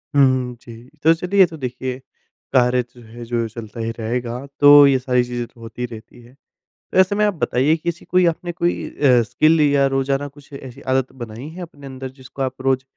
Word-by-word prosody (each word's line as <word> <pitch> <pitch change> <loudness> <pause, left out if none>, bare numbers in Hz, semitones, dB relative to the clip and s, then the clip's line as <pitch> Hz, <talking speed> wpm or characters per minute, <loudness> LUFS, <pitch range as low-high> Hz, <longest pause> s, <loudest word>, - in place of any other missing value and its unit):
हुँ, 140 - +6
हुँ। 130 -2 0
जी, 115 0 -12 0.2
तो 165 +1 +6
चलिए 180 +4 -2
ये 190 - +9
तो 160 -2 -9
देखिए, 130 0 -5 0.5
कार्य 125 -1 +3
जो 120 - -15
है 120 +1 -10
जो 115 -1 -1
चलता 115 0 -9
ही 115 0 -2
रहेगा, 120 +3 -3
तो 145 0 +9
ये 135 -2 +3
सारी 125 -1 +1
चीज़ें 120 -1 -4
तो 120 - -23
होती 115 +2 -6
रहती 115 +1 -11
है। 120 +2 -18 0.4
तो - - -8
ऐसे 190 +2 +4
में 210 0 +2
आप 205 - +1
बताइए 150 -1 +1
कि 170 +2 -3
ऐसी 170 - -7
कोई 180 -1 +3
आपने 175 +1 -1
कोई 175 +1 -2
अ, 125 -4 +3
स्किल 155 +5 +3
या 140 -1 +3
रोजाना 135 +1 -1
कुछ 145 0 -17
ऐसी 130 -3 -10
आदत 130 0 0
बनाई 115 +5 -8
है 180 +3 -9
अपने 145 -5 -10
अंदर 130 0 -7
जिसको 135 +1 -9
आप 130 0 -3
रोज 130 0 +1
130 Hz, 215 wpm, -20 LUFS, 120-150 Hz, 0.5 s, ये